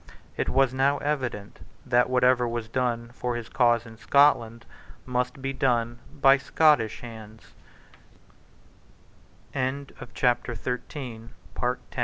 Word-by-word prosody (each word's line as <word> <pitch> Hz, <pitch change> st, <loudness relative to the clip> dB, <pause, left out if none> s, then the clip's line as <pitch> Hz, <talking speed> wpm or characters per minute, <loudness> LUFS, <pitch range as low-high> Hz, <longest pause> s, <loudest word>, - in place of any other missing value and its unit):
It -, -, -1 dB
was 135 Hz, -1 st, +2 dB
now 135 Hz, +2 st, +2 dB
evident 130 Hz, -9 st, -3 dB, 0.3 s
that 125 Hz, +1 st, +3 dB
whatever 125 Hz, -1 st, +3 dB
was 115 Hz, -1 st, -4 dB
done 120 Hz, -1 st, -2 dB
for 125 Hz, -1 st, -3 dB
his 115 Hz, -1 st, -6 dB
cause 120 Hz, -2 st, +2 dB
in 110 Hz, -1 st, -12 dB
Scotland 115 Hz, -2 st, +3 dB, 0.4 s
must 125 Hz, +1 st, -2 dB
be 135 Hz, 0 st, -2 dB
done 120 Hz, -3 st, 0 dB
by 135 Hz, -2 st, +5 dB
Scottish 145 Hz, -7 st, +2 dB
hands, 110 Hz, -2 st, -11 dB, 2.0 s
While 130 Hz, 0 st, -1 dB, 0.4 s
Mackay 125 Hz, 0 st, -3 dB
125 Hz, 105 wpm, -26 LUFS, 115-130 Hz, 2.0 s, by